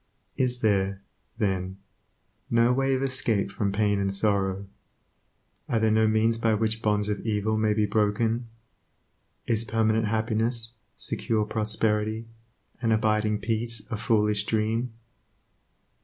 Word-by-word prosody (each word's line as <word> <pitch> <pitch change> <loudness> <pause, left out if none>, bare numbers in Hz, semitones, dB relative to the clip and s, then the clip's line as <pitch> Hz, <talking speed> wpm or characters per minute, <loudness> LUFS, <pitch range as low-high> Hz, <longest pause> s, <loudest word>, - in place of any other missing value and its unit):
Is 125 -1 0
there, 100 -2 +1 0.3
then, 95 -3 -1 0.7
no 115 +1 +4
way 135 +1 +1
of 130 - -1
escape 115 -7 0
from 100 0 -1
pain 100 0 +1
and 100 0 -1
sorrow? 100 -1 0 1.0
Are 115 - +2
there 110 0 +2
no 110 0 +4
means 110 +1 +2
by 115 -1 +2
which 110 +1 0
bonds 105 -1 +1
of 105 -1 -1
evil 110 -1 -1
may 110 -1 +2
be 105 0 +2
broken? 110 +3 0 1.0
Is 115 -1 +1
permanent 110 0 +1
happiness, 115 +1 0 0.2
secure 110 -2 -1
prosperity, 110 0 0 0.6
and 115 -2 +1
abiding 105 -1 +1
peace 115 +1 -2
a - - 0
foolish 105 -2 +2
dream? 110 +2 0
110 Hz, 125 wpm, -26 LUFS, 105-115 Hz, 1.0 s, no